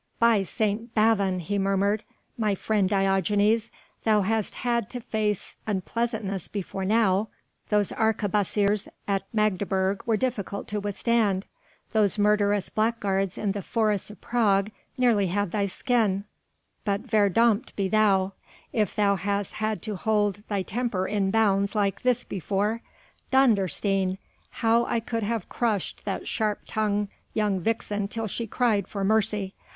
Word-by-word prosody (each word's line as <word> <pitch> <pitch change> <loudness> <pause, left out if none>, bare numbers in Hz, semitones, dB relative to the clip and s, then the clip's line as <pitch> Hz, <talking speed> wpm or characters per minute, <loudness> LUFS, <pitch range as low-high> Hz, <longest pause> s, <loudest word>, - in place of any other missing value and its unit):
"By 230 -3 +4
St. 215 +4 -2
Bavon," 200 -4 +3
he 200 +5 -2
murmured, 195 +2 +1 0.3
"my 210 -3 +1
friend 200 -1 +1
Diogenes, 200 +3 +2 0.3
thou 215 -2 +4
hast 215 +1 0
had 235 -3 -1
to 250 - -5
face 215 -3 -2
unpleasantness 210 -1 -2
before 195 -1 -4
now 210 -1 +3 0.4
those 210 -2 +2
arquebusiers 210 -1 +1 0.2
at 195 -1 0
Magdeburg 200 -2 +1
were 225 -2 +3
difficult 210 -5 -3
to 210 - -1
withstand, 205 -1 +1 0.5
those 215 -2 +3
murderous 205 -1 +2
blackguards 205 -4 0
in 205 - 0
the 200 0 -3
forests 210 -2 0
of 210 - -12
Prague 210 -4 +2 0.3
nearly 230 -6 +3
had 205 +1 -1
thy 200 0 0
skin, 210 -2 +1 0.6
but 200 -1 0
verdommt 220 +1 +2
be 195 -2 0
thou, 195 -2 +3 0.4
if 210 -5 0
thou 200 -2 +3
hast 200 0 -2
had 215 0 -2
to 215 -2 -3
hold 205 0 0
thy 200 -2 -1
temper 215 -3 -1
in 200 -2 0
bounds 200 -1 +2
like 200 -2 0
this 250 -1 +2
before. 205 +4 -1 0.5
Dondersteen! 195 - +2 0.3
how 230 +1 +2
I 235 - 0
could 230 0 -3
have 220 -2 -2
crushed 220 -6 -2
that 200 - -3
sharp 215 -1 -1
tongued 210 -1 0 0.3
young 210 -3 +1
vixen 205 0 -1
till 225 +2 -3
she 225 +2 -4
cried 215 -4 +1
for 200 -2 -4
mercy 210 -1 +1
205 Hz, 140 wpm, -26 LUFS, 195-220 Hz, 0.6 s, By